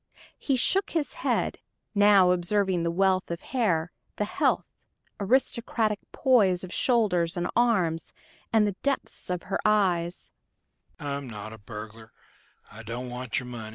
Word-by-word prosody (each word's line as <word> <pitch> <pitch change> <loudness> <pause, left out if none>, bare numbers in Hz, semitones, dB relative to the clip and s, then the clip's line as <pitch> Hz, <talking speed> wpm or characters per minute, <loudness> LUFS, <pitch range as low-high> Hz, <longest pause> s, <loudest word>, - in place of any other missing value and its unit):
He 275 - +1
shook 390 - +1
his 320 -4 -2
head, - - 0 0.3
now 200 -3 +6
observing 180 0 +1
the 170 - 0
wealth 190 +2 +1
of 170 0 -3
hair, 180 -10 0 0.2
the 210 - -1
healthy, - - +1 0.6
aristocratic 225 -1 +1
poise 200 -9 +3
of 185 - -7
shoulders 190 -9 +2
and 175 0 0
arms, 185 -9 +1 0.4
and 220 -2 +4
the 205 -2 -1
depths 280 -8 -3
of 180 -1 -2
her 195 - -2
eyes. 180 -5 +1
200 Hz, 105 wpm, -27 LUFS, 180-230 Hz, 0.6 s, now